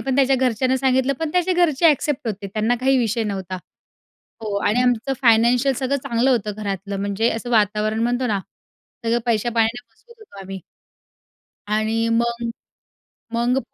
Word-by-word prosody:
पण 265 Hz, -1 st, -1 dB
त्याच्या 270 Hz, -1 st, +4 dB
घरच्यांना 255 Hz, 0 st, +1 dB
सांगितलं, 260 Hz, +1 st, +2 dB
पण 320 Hz, -2 st, -1 dB
त्याचे 360 Hz, +1 st, +2 dB
घरचे 340 Hz, -3 st, +3 dB
एक्सेप्ट 290 Hz, -1 st, -1 dB
होते. 200 Hz, -1 st, -4 dB
त्यांना 215 Hz, +4 st, 0 dB
काही 265 Hz, +1 st, +3 dB
विषय 230 Hz, -1 st, 0 dB
नव्हता. 190 Hz, -3 st, -4 dB, 0.9 s
हो 210 Hz, -2 st, -3 dB
आणि 235 Hz, +4 st, +2 dB
आमचं 250 Hz, +2 st, +1 dB
फायनान्शियल 240 Hz, +3 st, +4 dB
सगळं 270 Hz, +2 st, -1 dB
चांगलं 250 Hz, 0 st, 0 dB
होतं, 215 Hz, -4 st, 0 dB
घरातलं 200 Hz, 0 st, -4 dB
म्हणजे 200 Hz, +3 st, 0 dB
असं 235 Hz, +2 st, -4 dB
वातावरण 215 Hz, 0 st, +1 dB
म्हणतो 245 Hz, +2 st, 0 dB
ना 205 Hz, -4 st, 0 dB, 0.6 s
सगळं 230 Hz, +1 st, +2 dB
पैस्या-पाण्याने 235 Hz, +1 st, 0 dB
मजबूत 470 Hz, -, -21 dB
होतो 200 Hz, -, -13 dB
आम्ही. 190 Hz, 0 st, -7 dB, 1.1 s
आणि 220 Hz, +2 st, 0 dB
मग, 235 Hz, 0 st, -2 dB, 0.9 s
मग 240 Hz, +3 st, +1 dB
235 Hz, 150 wpm, -21 LUFS, 215-260 Hz, 1.1 s, त्याच्या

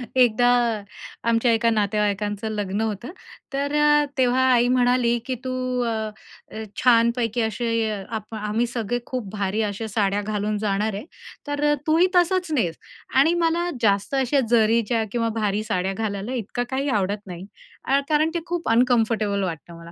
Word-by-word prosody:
एकदा 245 Hz, -1 st, +4 dB, 0.8 s
आमच्या 230 Hz, +1 st, +2 dB
एका 230 Hz, +1 st, +2 dB
नातेवाईकांचं 210 Hz, -1 st, 0 dB
लग्न 205 Hz, -1 st, -2 dB
होतं, 220 Hz, -, -3 dB, 0.4 s
तर 280 Hz, +1 st, -1 dB
अ, 295 Hz, 0 st, +4 dB
तेव्हा 255 Hz, 0 st, +3 dB
आई 240 Hz, -1 st, +4 dB
म्हणाली, 245 Hz, -1 st, +2 dB
की 255 Hz, -, -2 dB
"तू 260 Hz, -, -3 dB, 0.3 s
अ, 235 Hz, -, -1 dB, 0.6 s
अ, 220 Hz, 0 st, -6 dB, 0.2 s
छानपैकी 235 Hz, -1 st, +3 dB
असे 225 Hz, 0 st, -1 dB, 0.2 s
आप 220 Hz, -1 st, -6 dB
आम्ही 215 Hz, +2 st, -1 dB
सगळे 235 Hz, 0 st, -2 dB
खूप 250 Hz, -6 st, -5 dB
भारी 200 Hz, +1 st, -1 dB
अशा 210 Hz, +1 st, -3 dB
साड्या 205 Hz, -1 st, 0 dB
घालून 210 Hz, 0 st, -2 dB
जाणार 210 Hz, +1 st, -1 dB
आहे, 200 Hz, +6 st, -6 dB, 0.4 s
तर 290 Hz, 0 st, -2 dB
अ, -, -, +4 dB
तूही 325 Hz, +4 st, +4 dB
तसंच 360 Hz, -1 st, +2 dB
नेस" 215 Hz, -, 0 dB, 0.4 s
आणि 280 Hz, +6 st, +5 dB
मला 340 Hz, +2 st, +1 dB
जास्त 205 Hz, +3 st, +1 dB
अशा 270 Hz, +1 st, +2 dB
जरीच्या 230 Hz, 0 st, +3 dB
किंवा 230 Hz, 0 st, 0 dB
भारी 210 Hz, 0 st, 0 dB
साड्या 190 Hz, -3 st, -1 dB
घालायला 205 Hz, +2 st, -3 dB
इतकं 245 Hz, 0 st, -3 dB
काही 270 Hz, +2 st, -1 dB
आवडत 205 Hz, -2 st, -1 dB
नाही 180 Hz, 0 st, -8 dB, 0.4 s
अ, 275 Hz, +1 st, +3 dB
कारण 310 Hz, +1 st, +3 dB
ते 340 Hz, -, 0 dB
खूप 345 Hz, -4 st, -3 dB
अनकम्फर्टेबल 225 Hz, -4 st, +2 dB
वाटतं 170 Hz, -1 st, -6 dB
मला. 170 Hz, 0 st, -12 dB
230 Hz, 155 wpm, -23 LUFS, 205-255 Hz, 0.8 s, आणि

